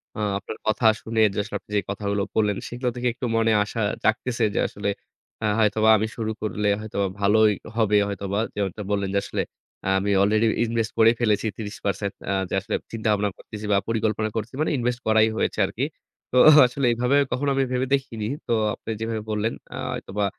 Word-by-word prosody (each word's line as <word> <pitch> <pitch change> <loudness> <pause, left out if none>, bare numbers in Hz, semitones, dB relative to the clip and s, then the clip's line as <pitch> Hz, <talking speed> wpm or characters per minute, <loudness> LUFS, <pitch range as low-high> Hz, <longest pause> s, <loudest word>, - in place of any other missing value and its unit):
অ্যা - - -4 0.2
আপনার 105 - -8
কথা 110 +2 +1 0.2
শুনে 110 0 0
যে - - -2
আসলে 105 - -7
আপনি - - -22
যে - - +2
কথাগুলো 100 0 -2
বললেন 105 -2 +2
সেগুলো 125 +1 -2
থেকে 125 0 -1
একটু 125 - -5
মনে 115 0 +3
আশা 110 +2 -4 0.2
জাগতেছে 120 +2 +1
যে - - +2
আসলে 100 0 -3 0.6
আ - - +2
হয়তোবা 110 0 +3
আমি 110 - -1
শুরু 110 -1 -2
করলে 105 -1 -1
হয়তোবা 105 -2 -2
ভালোই 105 +1 +4 0.2
হবে। 105 -2 +3
হয়তোবা 100 0 -3 0.2
যেমনটা 100 0 -2
বললেন 100 -1 0
যে - - +4
আসলে - - -2 0.6
আমি 100 +1 0
already 110 +3 +3 0.2
invest 115 -1 -1
করেই 115 +1 +6
ফেলেছি 110 -2 +1
৩০% 100 -2 -3
অ্যা 100 - 0
যে - - -6
আসলে - - -3 0.2
চিন্তা 110 -1 -3
ভাবনা 105 0 +1
করতেছি 105 0 -9
বা 100 - +5
পরিকল্পনা 110 -1 0
করছি 110 +3 -3
মানে - - +1
invest 125 0 -1
করাই 110 0 +5
হয়েছে - - -1
আরকি। 110 +8 -2 0.5
তো 125 - +1 0.3
আসলে 125 +1 -2
এইভাবে 125 +3 +1 0.2
কখনো 140 +3 0
আমি 135 - +2
ভেবে 130 +1 0
দেখিনি। 115 -6 -4 0.2
তো - - +1 0.2
আপনি - - -10
যেভাবে 110 -1 -2
বললেন 110 +2 0 0.2
অ্যা - - -6
হয়তোবা 100 +1 -3
110 Hz, 190 wpm, -24 LUFS, 105-115 Hz, 0.6 s, করেই